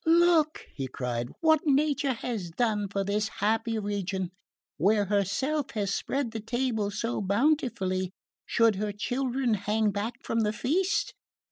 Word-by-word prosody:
"Look," 330 -2 +4
he 135 -2 -4
cried, 120 -1 -3
"what 315 -1 +4
Nature 285 -1 +2
has 225 -6 -4
done 210 +2 0
for 195 0 -1
this 205 +2 0
happy 225 +2 +1
region! 195 -3 -2 0.5
Where 205 +5 +3
herself 210 - 0
has 200 -2 0
spread 270 -4 -1
the 225 - -4
table 225 -2 -1
so 220 +3 -2
bountifully, 200 - +1 0.4
should 225 -4 +3
her 210 0 -2
children 250 +2 0
hang 210 +1 +1
back 210 +4 -3
from 230 - -1
the 210 -1 +1
feast? 355 - 0
220 Hz, 140 wpm, -28 LUFS, 200-265 Hz, 0.5 s, Look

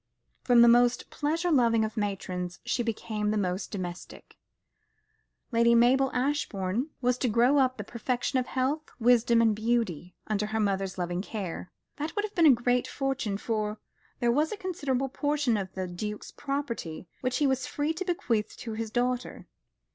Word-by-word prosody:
From 240 -2 +6
the - - +7
most 240 +1 +4
pleasure 330 +4 -1
loving 230 -6 +4
of 220 - -6
matrons, 185 -4 -3
she 240 0 0
became 215 -2 -2
the 215 - +1
most 185 -1 -1
domestic. 180 -3 -7 1.2
Lady 235 0 +4
Mabel 260 +3 +4
Ashbourne 250 -3 -1
was 250 0 +1
to 250 - +1
grow 245 +6 +4
up 255 -1 +2
the 210 - -4
perfection 245 +4 -1
of 250 - -3
health, 270 +4 0 0.2
wisdom, 235 -1 +4
and 220 -2 +3
beauty, 215 -6 -1
under 210 -1 -1
the 220 +1 -2
mother's 195 -2 -1
loving 175 0 -2
care. 190 -4 -5 0.3
She 300 - -1
would 415 0 0
have 370 -6 +2
a - - +9
great 245 -1 +3
fortune, 270 -7 -2
for 215 -1 -2 0.4
there 240 -2 +2
was 300 +5 +1
a 430 - -4
considerable 285 -9 -2
portion 290 -2 0
of 195 -3 -3
the 190 -1 -2
Duke's 210 +4 -6
property 245 - -4
which 255 -1 -1
he 295 - +2
was 265 -1 +1
free 295 +2 -1
to 340 +4 -4
bequeath 235 - -1
to 225 - -6
his 225 0 -4
daughter. 245 +2 -2
235 Hz, 170 wpm, -28 LUFS, 210-265 Hz, 1.2 s, a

